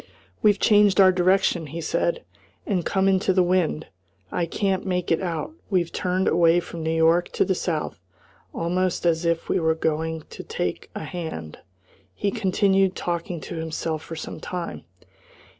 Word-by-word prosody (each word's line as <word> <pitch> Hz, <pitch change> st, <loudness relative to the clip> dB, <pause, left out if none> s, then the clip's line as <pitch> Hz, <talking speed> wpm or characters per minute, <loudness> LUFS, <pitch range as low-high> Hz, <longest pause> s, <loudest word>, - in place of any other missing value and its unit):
"We've 205 Hz, -2 st, +4 dB
changed 205 Hz, -1 st, +4 dB
our 190 Hz, -1 st, +8 dB
direction," 180 Hz, -2 st, +2 dB
he 160 Hz, +4 st, -6 dB
said, 170 Hz, +1 st, -1 dB, 0.4 s
"and 185 Hz, -4 st, 0 dB
come 190 Hz, +2 st, +1 dB
into 190 Hz, 0 st, +3 dB
the 185 Hz, -1 st, +4 dB
wind. 175 Hz, -3 st, +1 dB, 0.5 s
I 170 Hz, -, -1 dB
can't 195 Hz, +2 st, 0 dB
make 180 Hz, -2 st, -2 dB
it 165 Hz, -, +2 dB
out. 170 Hz, -, -3 dB, 0.2 s
We've 180 Hz, -4 st, +1 dB
turned 185 Hz, +1 st, 0 dB
away 170 Hz, 0 st, +4 dB
from 170 Hz, -1 st, -7 dB
New 160 Hz, -, -1 dB
York 165 Hz, +2 st, +3 dB
to -, -, +2 dB
the 190 Hz, -, +1 dB
south. 165 Hz, -, -3 dB, 0.5 s
Almost 180 Hz, +1 st, -1 dB
as 170 Hz, 0 st, +2 dB
if 170 Hz, 0 st, 0 dB
we -, -, +1 dB
were 160 Hz, -1 st, +2 dB
going 160 Hz, 0 st, -1 dB
to -, -, -7 dB
take 455 Hz, +2 st, -3 dB
a -, -, -4 dB
hand 160 Hz, -, -6 dB, 0.3 s
" -, -, -31 dB
He 200 Hz, -, -1 dB
continued 195 Hz, -2 st, +2 dB
talking 170 Hz, 0 st, -3 dB
to 175 Hz, -, -7 dB
himself 160 Hz, -1 st, -3 dB
for 165 Hz, -, -8 dB
some 160 Hz, -, -7 dB
time. 180 Hz, -2 st, -5 dB
175 Hz, 170 wpm, -24 LUFS, 165-190 Hz, 0.5 s, our